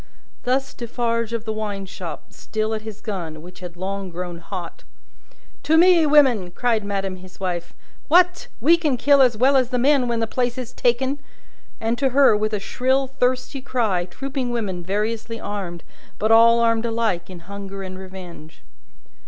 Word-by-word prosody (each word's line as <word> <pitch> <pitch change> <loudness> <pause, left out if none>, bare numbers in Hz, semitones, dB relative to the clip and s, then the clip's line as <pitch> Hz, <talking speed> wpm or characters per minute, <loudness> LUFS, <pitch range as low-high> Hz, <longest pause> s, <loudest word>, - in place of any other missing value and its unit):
Thus 265 +2 0
Defarge 230 -1 -2
of 230 -1 -3
the 220 - -2
wine 205 -2 -4
shop, 170 -6 -8
still 220 0 -3
at 215 - -3
his 215 -1 -9
gun, 165 -7 -5
which 180 +1 -12
had 175 -1 -9
long 195 +1 -4
grown 175 0 -6
hot. 175 0 -7 0.8
"To 320 - +3
me, 340 -2 +6
women!" 260 -11 +4
cried 225 +3 0
madame 195 -2 -3
his 185 0 -14
wife. 175 -2 -3 0.3
"What! 355 +3 +4
We 330 +8 +5
can 300 -6 0
kill 280 +3 +5
as 245 -4 +4
well 265 +4 +4
as 255 -2 +3
the 250 - 0
men 265 0 +3
when 235 -1 0
the 225 - +1
place 245 +2 -1
is 255 -1 -6
taken!" 260 +4 +1 0.6
And 230 +1 -1
to 275 -1 +2
her, 275 -6 +7
with 215 +1 0
a 210 - 0
shrill 260 +6 +1
thirsty 255 0 -1
cry, 220 -9 0
trooping 265 +6 -4
women 205 -7 -3
variously 220 +4 -2
armed, 190 -5 -5 0.3
but 215 +1 +1
all 230 +1 +7
armed 230 0 +2
alike 225 -7 -1
in 180 -2 -9
hunger 195 +1 -7
and 185 0 -7
revenge. 180 -4 -11
225 Hz, 175 wpm, -22 LUFS, 190-255 Hz, 0.8 s, her